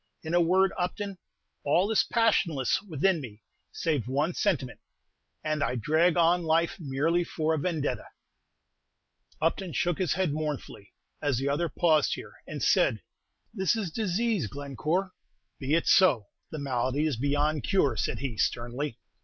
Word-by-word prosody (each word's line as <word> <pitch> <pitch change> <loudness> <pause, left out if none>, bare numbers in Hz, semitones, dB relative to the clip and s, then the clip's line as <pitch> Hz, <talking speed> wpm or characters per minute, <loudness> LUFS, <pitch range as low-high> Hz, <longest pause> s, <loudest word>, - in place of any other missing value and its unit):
In 160 +1 -4
a 175 - +5
word, 190 +3 +3
Upton, 195 +1 -3 0.4
all 180 +8 +2
is 220 - +4
passionless 190 - +1
within 180 -2 0
me, 110 -5 -10 0.3
save 150 -8 -1
one 145 +7 0
sentiment; 140 - -1 0.6
and 155 -1 -1
I - - 0
drag 160 +8 +2
on 170 +1 +4
life 165 +4 +1
merely 160 +4 0
for 160 -1 -1
a 160 - 0
'Vendetta.'" 160 -3 -2 1.3
Upton 165 +2 -1
shook 175 +5 0
his 180 -7 +1
head 185 -4 0
mournfully, 150 -9 -5 0.3
as 145 -5 +1
the 135 +3 -1
other 160 +4 0
paused 155 0 +2
here, - - -10
and - - -5
said, - - +3 0.5
"This 190 0 +1
is 205 -7 -3
disease, 210 - 0
Glencore!" 145 - -2 0.5
"Be 140 +3 +1
it 170 - +1
so; 135 - +4 0.2
the 155 - -6
malady 135 +1 -1
is 155 -4 0
beyond 145 +3 0
cure," 145 - +2
said - - -1
he, 125 -5 -4
sternly. 120 +2 -1
155 Hz, 150 wpm, -28 LUFS, 140-180 Hz, 1.3 s, a